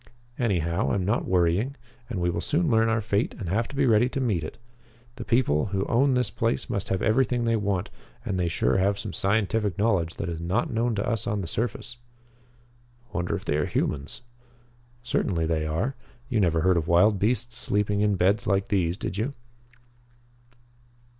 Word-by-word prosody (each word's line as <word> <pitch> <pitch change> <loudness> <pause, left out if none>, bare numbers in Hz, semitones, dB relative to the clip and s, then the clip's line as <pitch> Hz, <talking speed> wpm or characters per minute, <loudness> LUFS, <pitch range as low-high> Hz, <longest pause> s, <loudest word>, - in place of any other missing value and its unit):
Anyhow, 85 - 0
I'm 95 -2 0
not 105 +5 0
worrying, 90 +9 +1 0.3
and 110 -7 -3
we 85 0 +1
will 85 0 -2
soon 155 - +1
learn 115 0 +4
our 110 0 +1
fate 105 +1 -1
and 100 - -5
have 115 +5 0
to 145 - -10
be 140 0 +2
ready 120 +1 +4
to 135 - -3
meet 105 -11 0
it. 80 - -7 0.6
The - - -5
people 110 - +2
who 100 -1 -1
own 130 +3 +3
this 125 -4 +1
place 115 +2 -1
must 100 -5 -2
have 95 -1 -1
everything 120 +1 +2
they 115 0 +2
want, 100 -4 -1 0.3
and 95 - -1
they 90 - +1
sure 65 -6 +1
have 100 +1 +2
some - - -6
scientific 105 -1 0
knowledge 100 -6 +1
that - - -4
is 85 -2 -4
not 95 +9 -1
known 115 0 +1
to 100 - -2
us 115 -4 -1
on 105 -1 -1
the 90 - -5
surface." 120 +5 -3 1.2
"Wonder 90 -3 -1
if - - -6
they 75 - 0
are 75 - 0
humans?" 70 - -2 0.8
"Certainly 90 -8 0
they 80 -1 0
are. 95 - -1 0.4
You 120 -5 +1
never 85 -4 +2
heard 95 +1 +3
of 80 -1 -1
wild 95 +4 +4
beasts 120 +3 0
sleeping 105 0 0
in 105 -1 +2
beds 95 +4 +2
like 100 -1 +1
these, 90 -4 +1
did 95 +1 -4
you?" 135 +6 -2
100 Hz, 190 wpm, -26 LUFS, 90-115 Hz, 1.2 s, learn